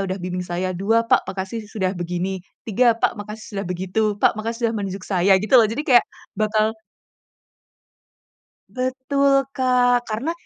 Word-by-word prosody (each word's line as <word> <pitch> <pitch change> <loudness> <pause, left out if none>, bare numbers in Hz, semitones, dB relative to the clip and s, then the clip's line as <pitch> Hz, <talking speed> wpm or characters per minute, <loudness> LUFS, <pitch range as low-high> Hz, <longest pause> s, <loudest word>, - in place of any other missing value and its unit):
udah 185 - -2
bimbing 180 0 -3
saya,” 180 +1 -2
dua, 225 +5 +2
“Pak - - +4
makasih 195 +4 -5
sudah 190 -4 -2
begini,” 180 +2 -3 0.3
tiga, 230 +2 +3
“Pak - - +2
makasih 210 +1 -8
sudah 195 - -2
begitu, 185 +4 -2 0.2
Pak - - +5
makasih 230 +2 -4
sudah 225 - -3
menunjuk 195 -1 -5
saya,” 190 0 +3
gitu 215 - 0
loh 220 - +4
jadi 265 +6 -2
kayak 245 -2 +6 0.3
bakal 215 +1 +1 2.0
Betul, 275 +2 +1
Kak, 250 -2 +2
karena 230 +9 -2
215 Hz, 150 wpm, -22 LUFS, 190-245 Hz, 2.0 s, kayak